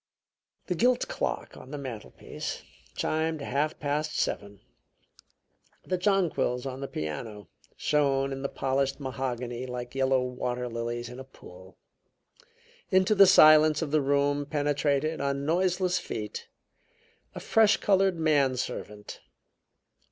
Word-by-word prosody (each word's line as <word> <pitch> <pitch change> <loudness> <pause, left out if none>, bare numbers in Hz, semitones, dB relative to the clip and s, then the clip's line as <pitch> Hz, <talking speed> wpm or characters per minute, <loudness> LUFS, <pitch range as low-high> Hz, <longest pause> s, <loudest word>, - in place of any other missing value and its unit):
The 180 - -1
gilt 245 +7 +2
clock - - -3
on 130 - -12
the 145 - -5
mantelpiece 125 -6 -7 0.3
chimed 160 -1 -1
half 145 +2 -1
past 150 +1 -2
seven. 100 0 -3 1.2
The 185 -1 -1
jonquils 180 -10 +1
on 130 -1 -5
the 135 - -3
piano 95 - -6 0.3
shone 140 -2 +1
in 135 0 -5
the 140 - -2
polished 135 +1 -1
mahogany 130 -2 -4
like 125 -1 -6
yellow 130 -1 +2
water 125 -1 -3
lilies 120 0 -4
in 125 +1 -9
a - - -7
pool. 95 -8 -15 1.1
Into 190 +1 +3
the 195 -2 +7
silence 155 -3 +7
of 150 - -5
the 155 -1 +3
room 145 +1 +1
penetrated, 145 +1 0
on 140 0 -1
noiseless 180 +2 +1
feet, 105 -1 -6 0.9
a - - -5
fresh 220 -1 +4
colored 195 -2 +2
man 145 -5 +2
servant. 105 -4 -6
140 Hz, 125 wpm, -28 LUFS, 125-155 Hz, 1.2 s, the